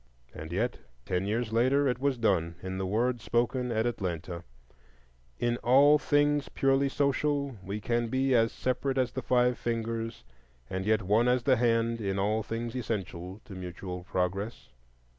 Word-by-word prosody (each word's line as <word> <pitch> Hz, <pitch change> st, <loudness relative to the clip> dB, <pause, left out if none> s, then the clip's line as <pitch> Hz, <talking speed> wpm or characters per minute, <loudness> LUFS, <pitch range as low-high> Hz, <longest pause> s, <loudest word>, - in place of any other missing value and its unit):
And 80 Hz, +2 st, -8 dB
yet 115 Hz, +8 st, -1 dB, 0.3 s
ten 90 Hz, +1 st, -1 dB
years 110 Hz, +1 st, -1 dB
later 130 Hz, +5 st, +3 dB
it 125 Hz, -2 st, 0 dB
was 140 Hz, -1 st, +1 dB
done 90 Hz, -7 st, +1 dB
in 95 Hz, 0 st, -4 dB
the 95 Hz, -, -2 dB
word 120 Hz, +4 st, 0 dB
spoken 120 Hz, +2 st, 0 dB
at 110 Hz, 0 st, +1 dB
Atlanta: 90 Hz, -6 st, -3 dB, 0.9 s
"In 120 Hz, 0 st, 0 dB
all 140 Hz, +5 st, +5 dB
things 145 Hz, 0 st, +2 dB
purely 135 Hz, 0 st, +2 dB
social 140 Hz, -1 st, 0 dB
we 100 Hz, +3 st, -4 dB
can 120 Hz, +2 st, 0 dB
be 130 Hz, +2 st, +1 dB
as 115 Hz, -2 st, +4 dB
separate 130 Hz, +1 st, -1 dB
as 125 Hz, -2 st, +1 dB
the 130 Hz, -, -4 dB
five 125 Hz, -1 st, +2 dB
fingers, 115 Hz, -1 st, -3 dB, 0.4 s
and 95 Hz, +5 st, -4 dB
yet 110 Hz, -1 st, +2 dB
one 105 Hz, +6 st, +3 dB
as 125 Hz, 0 st, +2 dB
the 130 Hz, 0 st, +4 dB
hand 115 Hz, -1 st, +1 dB
in 100 Hz, -2 st, -1 dB
all 105 Hz, +3 st, +1 dB
things 115 Hz, +2 st, -4 dB
essential 95 Hz, -5 st, -4 dB
to 100 Hz, -, -10 dB
mutual 90 Hz, 0 st, -6 dB
progress." 95 Hz, +5 st, -3 dB
115 Hz, 160 wpm, -29 LUFS, 100-125 Hz, 0.9 s, all